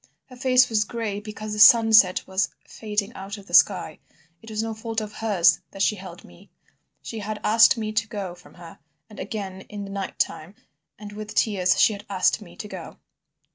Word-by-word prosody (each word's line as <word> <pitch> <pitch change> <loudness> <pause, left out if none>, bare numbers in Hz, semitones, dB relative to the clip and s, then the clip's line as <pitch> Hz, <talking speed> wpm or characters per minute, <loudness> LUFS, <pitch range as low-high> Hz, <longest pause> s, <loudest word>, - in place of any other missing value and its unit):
Her 255 - -12
face 255 0 +3
was 215 -2 +1
gray 215 -2 -4
because 215 0 -7
the 210 - -4
sunset 220 -4 +6
was 190 +1 -1 0.2
fading 210 0 -4
out 195 0 -8
of 200 - -13
the - - -15
sky. - - +3 0.4
It 225 - -13
was 215 0 -3
no 225 0 -4
fault 225 +1 -4
of 215 -1 -7
hers 205 -7 +2
that 195 - -3
she 215 - +2
held 185 -3 -11
me. 85 0 -18 0.5
She 225 - -6
had 210 0 -5
asked 225 +2 +5
me 215 -1 -3
to 215 +1 -1
go 200 -4 -6
from 180 - -18
her, 170 -1 -13 0.3
and 210 - -12
again 195 -2 -6
in 205 -1 -7
the 195 - -9
night 195 -1 -5
time 170 +6 -3 0.4
and 210 0 -10
with 215 +1 -8
tears 185 -4 +1
she 220 - +5
had 205 +1 -10
asked 195 +3 +1
me 175 -4 -14
to 210 - -8
go. - - -9
210 Hz, 205 wpm, -24 LUFS, 195-220 Hz, 0.5 s, sunset